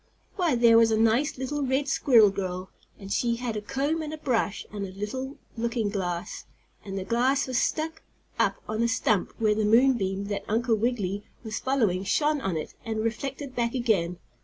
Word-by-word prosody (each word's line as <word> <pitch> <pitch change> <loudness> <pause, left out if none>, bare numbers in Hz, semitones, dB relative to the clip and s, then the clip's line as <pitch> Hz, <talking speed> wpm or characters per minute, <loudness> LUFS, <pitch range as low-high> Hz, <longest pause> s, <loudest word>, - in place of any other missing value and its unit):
Why, 345 - +2
there 235 -1 +6
was 230 -1 +5
a 220 - +2
nice, 230 +7 +2
little, 265 +3 -3
red 270 +1 0
squirrel 235 -7 +5
girl, 185 -1 -4 0.3
and 195 0 -5
she 235 -1 +1
had 235 -2 -3
a 210 - -2
comb 275 +8 -1
and 305 -1 -5
a 310 - -5
brush, 235 -8 -1
and 200 -3 -5
little 260 +7 -4 0.2
looking 230 -2 -1
glass. 185 -1 -4 0.4
And 195 -1 -6
the 190 - -2
glass 255 +6 +2
was 255 -2 0
stuck 320 +1 -1 0.4
up - - +3
on 215 +1 -2
a 235 - +3
stump 225 -4 +1
where 215 -2 +3
the 215 +1 0
moon 245 +5 +5
beam 195 0 -2
that 205 - -2
Uncle 230 +2 +1
Wiggily 210 -3 -1 0.2
was 220 -2 -4
following 225 -9 +1
shone 295 +8 +1
on 185 -8 -1
it 155 - -5
and 220 -1 -2
reflected 265 +4 -4
back 235 +1 0
again. 195 -8 +1
230 Hz, 190 wpm, -27 LUFS, 205-265 Hz, 0.4 s, there